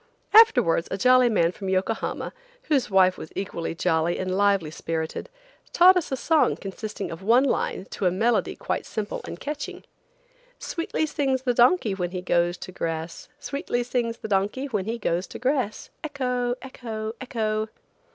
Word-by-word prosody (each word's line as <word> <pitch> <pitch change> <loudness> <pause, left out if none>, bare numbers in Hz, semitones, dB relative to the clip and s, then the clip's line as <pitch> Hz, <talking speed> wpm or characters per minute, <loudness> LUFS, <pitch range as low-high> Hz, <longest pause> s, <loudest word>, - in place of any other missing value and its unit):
Afterwards 430 - +6
a 190 - -2
jolly 255 +3 +5
man 170 -6 +2
from 195 +1 -6
Yokohama, 190 +4 -1 0.4
whose 275 -5 +2
wife 185 -1 +4
was 155 - -8
equally 170 -4 -4
jolly 165 -1 +1
and 185 0 -2
lively 200 -5 +2
spirited, 160 - -4 0.4
taught 365 +2 +7
us 355 -6 -1
a 265 - 0
song 320 +3 +3
consisting 205 +1 -6
of 165 +2 -7
one 235 +6 +4
line 250 -7 -1
to 190 - 0
a - - +3
melody 220 +1 +1
quite - - -3
simple 215 -1 -4
and 170 - -7
catching. 295 +1 -5 0.7
"Sweetly 330 -2 -2
sings 270 -4 -1
the 250 -2 +1
donkey 240 - +4
when 180 -2 -2
he 180 0 -5
goes 175 0 +1
to - - -8
grass, 165 -2 -4
Sweetly 280 -4 -2
sings 235 -1 -1
the - - -7
donkey 205 +6 0
when 210 -9 -2
he 230 +2 -2
goes 180 -4 -1
to - - -8
grass, 255 -3 -1
Ec 300 -2 -6
ho! 250 -2 0
Ec 265 - -11
ho! 220 -2 -4
Ec 260 - -9
ho!" 215 -1 0
215 Hz, 175 wpm, -25 LUFS, 185-255 Hz, 0.7 s, taught